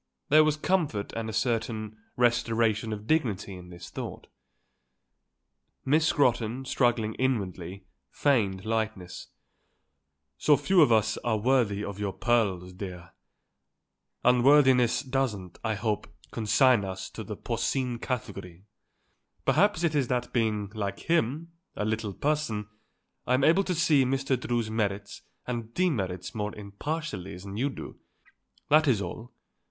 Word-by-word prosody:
There 155 +2 +7
was 155 -1 +1
comfort 155 - 0
and 115 -1 -3
a - - -5
certain 110 -2 -1 0.2
restoration 115 -2 +2
of 105 0 -5
dignity 110 -9 0
in 90 -1 -10
this 85 0 -11
thought. - - -6 1.6
Miss 155 +4 +3
Scrotton, 125 -3 +1
struggling 120 -4 +1
inwardly, 95 -7 -2 0.2
feigned 100 - +1
lightness. 110 -5 -3 1.1
"So 150 -1 +5
few 190 +5 +4
of 145 - +5
us 110 -1 +3
are 115 -2 0
worthy 110 -3 +1
of 100 0 -6
your 100 -2 -2
pearls, 100 -7 0
dear. 90 -2 -8 1.1
Unworthiness 125 0 +5
doesn't, 120 -10 -2
I 110 -1 0
hope, 105 0 -2 0.2
consign 115 +1 +3
us 95 0 -5
to - - -7
the - - -6
porcine 125 -3 -2
category. 100 -9 -5 0.8
Perhaps 190 0 +3
it 165 -2 +2
is 140 -4 +1
that 125 0 -2
being, 105 -4 0
like 100 -3 -4
him, 165 0 0 0.2
a 105 - -2
little 110 -2 -2
person, 140 -9 -1 0.6
I'm 130 +2 +2
able 170 +7 +5
to 180 - -1
see 155 -5 +4
Mr. 135 +1 0
Drew's 120 -3 -1
merits 105 -2 -2 0.2
and 115 -2 -4
demerits 95 - -1
more 105 -1 -3
impartially 105 - -5
than 100 +2 -8
you 130 +6 0
do. - - -9 0.7
That 155 +1 +5
is 120 -7 +3
all. 110 +6 -6
115 Hz, 130 wpm, -28 LUFS, 100-135 Hz, 1.6 s, There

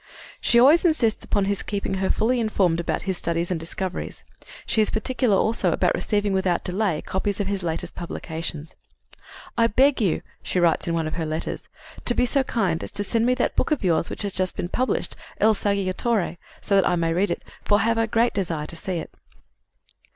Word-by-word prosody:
" - - -18
She 235 - +4
always 290 +7 +6
insists 285 -11 +2
upon 200 -2 +1
his 200 0 -1
keeping 200 -1 -3
her 190 - +1
fully 245 +3 +1
informed 190 -7 +1
about 170 - -2
his 190 -3 -2
studies 170 +1 -1
and 175 - -1
discoveries. 180 +3 -5 0.4
She 220 - +2
is 215 - +2
particular, 240 -1 +1
also, 225 +3 +1
about - - +2
receiving 205 -2 0
without 185 -2 +1
delay 185 -4 -1
copies 200 +1 -2
of 205 - 0
his 200 0 -2
latest 170 0 -3
publications. 165 -2 -5 0.9
"I 230 - +5
beg 260 +3 +3
you," 190 -6 +1 0.2
she 185 - -1
writes 170 -1 +2
in 165 - 0
one 165 -1 0
of 155 - -4
her 165 - -1
letters, 155 +1 -4 0.4
"to 240 - +3
be - - +3
so 275 +3 +2
kind 195 -10 0
as - - -4
to 205 - 0
send 225 +4 +1
me 250 - +3
that - - -1
book - - +1
of 300 -7 0
yours 170 -3 +1
which - - -4
has 200 -2 -2
just 185 -1 0
been 175 - -3
published, 255 +6 -1 0.2
Il 220 +1 +5
Saggiatore, 200 0 0 0.2
so - - -2
that 195 - +4
I - - +2
may 165 -1 0
read 190 +4 +1
it; - - -3 0.2
for 205 - +3
I - - +1
have 230 0 +2
a 225 - +2
great 230 +2 +2
desire 170 -6 -2
to 165 - -7
see 185 +3 -4
it." 160 - -6
195 Hz, 215 wpm, -24 LUFS, 175-225 Hz, 0.9 s, always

